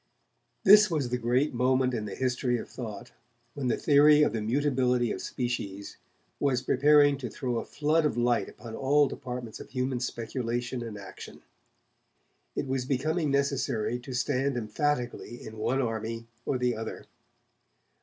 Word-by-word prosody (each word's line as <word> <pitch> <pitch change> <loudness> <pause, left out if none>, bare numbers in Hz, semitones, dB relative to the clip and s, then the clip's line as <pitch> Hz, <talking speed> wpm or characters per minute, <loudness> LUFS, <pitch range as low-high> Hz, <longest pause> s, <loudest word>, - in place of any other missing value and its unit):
This 210 0 +8
was 150 -7 -1
the 125 0 -1
great 125 +5 +1
moment 130 +1 +2
in 110 -3 -2
the 105 - -6
history 125 -1 0
of - - -7
thought 110 -4 -8 0.4
when 140 -3 -3
the 120 - +1
theory 150 0 +6
of 130 - +1
the 110 - -2
mutability 125 0 +1
of - - -4
species 100 -6 -4 0.4
was 130 -3 +1
preparing 145 0 +4
to 125 -3 -4
throw 125 0 -3
a - - -6
flood 155 +2 +1
of 145 -6 0
light 120 -1 +1
upon 115 -2 -9
all 145 +2 +3
departments 125 -4 -6
of - - -10
human 130 0 -2
speculation 120 +1 -3
and 115 -3 -6
action. 100 -2 -11 1.1
It - - -1
was 130 -1 -2
becoming 155 +4 0
necessary 135 -4 0
to 130 +1 -8
stand 130 +1 0
emphatically 120 +1 -2
in 110 0 -9
one 130 +5 0
army 115 0 -3 0.2
or 135 - +1
the 125 -1 0
other. 110 0 -6
125 Hz, 155 wpm, -28 LUFS, 120-140 Hz, 1.1 s, This